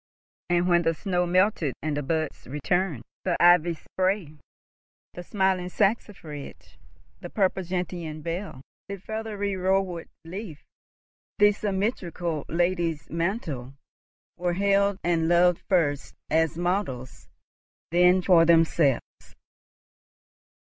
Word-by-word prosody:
And, 175 0 +2
when 175 -1 +4
the 165 -1 +1
snow 180 0 -1
melted 180 -5 +2
and 155 -1 -1
the 145 - -1
buds 155 +1 -3
returned, 150 0 -1 0.2
the 180 -2 0
ivy 175 -1 +5
spray, 185 -2 -2 0.7
the 175 - -7
smiling 190 -1 0
saxifrage, 195 -8 -3 0.4
the - - -8
purple 190 -2 +1
gentian 175 -3 -4
bell, 170 -5 -5 0.3
the 200 - -4
feathery 205 0 -4
rowan 185 -2 0 0.2
leaf, 175 -3 -8 0.7
the 205 0 +6
symmetrical 190 - -2
lady's 170 -2 -1
mantle, 165 - -3 0.6
were 175 0 -1
hailed 200 +1 +2
and 165 -2 +1
loved 175 0 +4
first 145 -7 +1 0.2
as 160 0 +2
models, 175 -8 -3 0.6
then 180 +1 +4
for 175 -3 +6
themselves. 165 -5 +2
175 Hz, 105 wpm, -26 LUFS, 160-190 Hz, 0.7 s, the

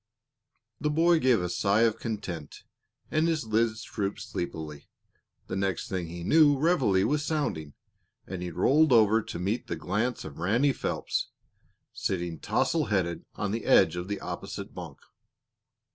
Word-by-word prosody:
The 150 - 0
boy 165 +2 +4
gave 125 -8 +3
a - - -1
sigh 100 +4 +2
of 115 -1 +2
content, 95 -9 -5 0.5
and 155 +2 +2
his 160 -6 0
lids 110 0 0
drooped 100 -2 -3
sleepily. 80 -7 -6 0.6
The - - -5
next 95 -2 -1
thing 90 -3 -2
he 85 +1 -7
knew 145 - +5
reveille 130 - +3
was 150 +4 +1
sounding, 140 - -2 0.5
and 95 -1 -6
he 90 - -3
rolled 150 - +3
over 110 -1 +5
to 105 - -7
meet 100 +7 -2
the - - -2
glance 110 +7 -2
of 80 -1 -9
Ranny 120 - +2
Phelps, - - -2 0.6
sitting 85 -3 -3
tousle 160 -3 +1
headed 85 -5 -1
on 100 -1 -2
the 115 +1 -3
edge - - +5
of 90 +1 -4
the 100 0 -3
opposite - - -6
bunk. - - -8
105 Hz, 155 wpm, -28 LUFS, 90-135 Hz, 0.6 s, knew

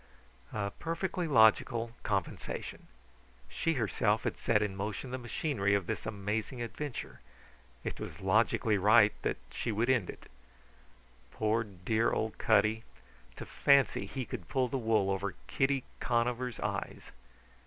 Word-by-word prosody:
A 100 -2 -2
perfectly 170 - -3
logical 115 -2 +4
compensation. 100 -4 -3 0.6
She 165 - 0
herself 115 - +1
had - - -1
set 105 -2 +2
in 100 -2 -3
motion 105 +6 -4
the 130 - -3
machinery 120 -4 0
of 100 -3 0
this - - -4
amazing 105 +4 -3
adventure; 120 +3 -5 0.6
it - - -4
was - - -7
logically 105 +2 +2
right 105 +1 +6
that - - -1
she - - -3
should 115 +4 +2
end 120 -8 +1
it. - - -9 1.0
Poor 110 +5 0
dear 105 +3 0
old 110 0 -2
Cutty 110 +1 +3 0.5
to - - -7
fancy 140 -8 +3
he 130 +4 -4
could 115 -10 -7
pull 130 -1 +1
the 135 +2 -2
wool 110 -4 +2
over 95 0 -2
Kitty 135 -1 +1 0.2
Conover's 120 0 0
eyes! - - -4
110 Hz, 135 wpm, -32 LUFS, 100-125 Hz, 1.0 s, right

